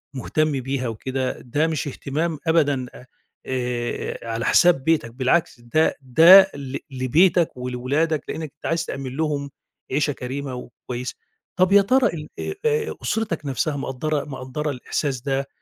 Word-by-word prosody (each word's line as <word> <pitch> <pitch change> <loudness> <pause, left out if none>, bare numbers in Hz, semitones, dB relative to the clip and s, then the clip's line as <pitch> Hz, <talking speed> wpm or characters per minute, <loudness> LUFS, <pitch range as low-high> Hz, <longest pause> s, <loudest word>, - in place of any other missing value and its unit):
مُهتم 155 +4 0
بيها 130 0 -2
وكده، 130 +3 -3
ده 145 +6 0
مش 155 -4 -2
اهتمام 150 +3 -3
أبدًا، 145 -5 +2
أ 125 - -12 0.4
آآ 125 -2 -3
على 115 0 -2
حساب 175 -2 +4
بيتك، 155 -6 +1
بالعكس، 130 +2 +1
ده 155 +7 +1
ده 170 +9 +8
ل 140 -1 -5
لبيتك 155 +6 +2
ولولادك، 130 +6 -1
لأنّك 160 -3 -5
أنت - - -15
عايز 165 0 0
تأمِّن 135 -4 -5
لهم 145 -3 -1 0.4
عيشة 145 +1 +1
كريمة 130 +1 -5
وكويسة. 125 0 -7 0.4
طَب 185 +1 +3
يا 200 0 +8
ترى 255 +6 +3
ال 150 -2 -7
آآ، 395 - -3
آآ 455 -1 +1
أُسرتَك 200 -9 -2
نَفسها، 140 +2 -1
مقدّرة 140 +2 -2
مقدّرة 145 +2 -4
الإحساس 130 0 -3
ده، 135 0 -1
140 Hz, 145 wpm, -23 LUFS, 130-160 Hz, 0.4 s, ده